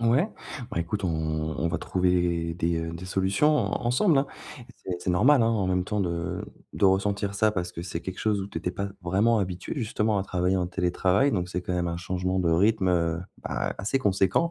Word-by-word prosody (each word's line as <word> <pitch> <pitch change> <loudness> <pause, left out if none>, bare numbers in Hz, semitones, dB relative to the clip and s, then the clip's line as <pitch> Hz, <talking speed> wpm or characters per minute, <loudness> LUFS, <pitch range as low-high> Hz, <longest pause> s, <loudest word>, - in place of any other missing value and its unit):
Ouais, 120 - +3 0.4
ben 85 - -1
écoute 100 +4 -3
on 90 - +1
on 80 0 -1
va - - -1
trouver 90 -2 0
des, 85 -1 0
heu, 80 0 -4
des 85 +2 -7
solutions 95 +11 +2
en - - -1
ensemble, 140 - +3
hein. 135 - +2 0.6
C'est - - -3
c'est 90 - -2
normal, 120 +9 +5
hein, - - +3
en 110 -4 +1
même 90 0 +1
temps 105 +1 -1
de 85 -1 -2 0.3
de - - 0
ressentir 100 +1 +1
ça, 110 +2 +3
parce 90 -3 -3
que 85 - -6
c'est 85 -1 -4
quelque 95 +2 -6
chose 105 -2 +1
où 95 - -4
tu - - -11
étais 90 - -2
pas 100 +2 -3
vraiment 100 +6 +3
habituée, 90 -2 -3
justement, 110 -3 0
à - - 0
travailler 90 0 0
en 90 - 0
télétravail. 95 +7 +2
Donc 90 -6 -1
c'est 90 - -2
quand 90 0 -3
même 90 -1 0
un 85 0 -3
changement 90 +1 -1
de 85 - +1
rythme, 100 +3 +3
heu, 85 -2 +1 0.2
ben - - -2
assez 110 +7 0
conséquent. 100 - +2
95 Hz, 220 wpm, -26 LUFS, 85-105 Hz, 0.6 s, normal